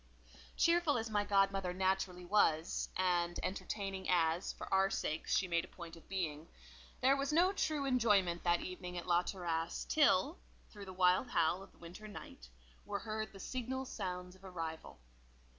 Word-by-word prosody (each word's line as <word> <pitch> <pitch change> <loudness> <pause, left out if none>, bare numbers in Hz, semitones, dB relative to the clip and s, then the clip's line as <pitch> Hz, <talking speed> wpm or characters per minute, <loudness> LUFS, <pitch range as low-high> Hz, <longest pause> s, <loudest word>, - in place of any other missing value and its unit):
Cheerful 335 -4 +3
as 225 -1 -3
my 205 -1 +2
godmother 195 -2 +2
naturally 185 -1 0
was, 165 -5 +2
and 175 -2 +1
entertaining 195 0 -3
as, 170 0 +2
for - - -8
our 195 0 +4
sakes, 155 -4 -1
she 190 - +1
made 170 -1 +1
a - - -9
point 170 -2 -10
of 165 - -17
being, 165 -5 -3 0.5
there 265 +2 +5
was 275 +1 -1
no 355 +5 +4
true 305 -7 0
enjoyment 210 -9 +3
that 175 -1 +3
evening 180 -1 -6
at 175 - -5
La 175 -1 +4
Terrasse, 170 -3 -3
till, 295 - +3 0.3
through 205 -2 -9
the 190 - -8
wild 185 +5 +3
howl 170 +3 +2
of 195 - -13
the - - -25
winter 175 +6 -10
night, 60 - -10 0.3
were 205 - -3
heard 215 +1 -4
the 195 - -12
signal 255 +5 -3
sounds 180 -6 -5
of 190 - -21
arrival. 165 - -6
190 Hz, 170 wpm, -35 LUFS, 175-215 Hz, 0.5 s, there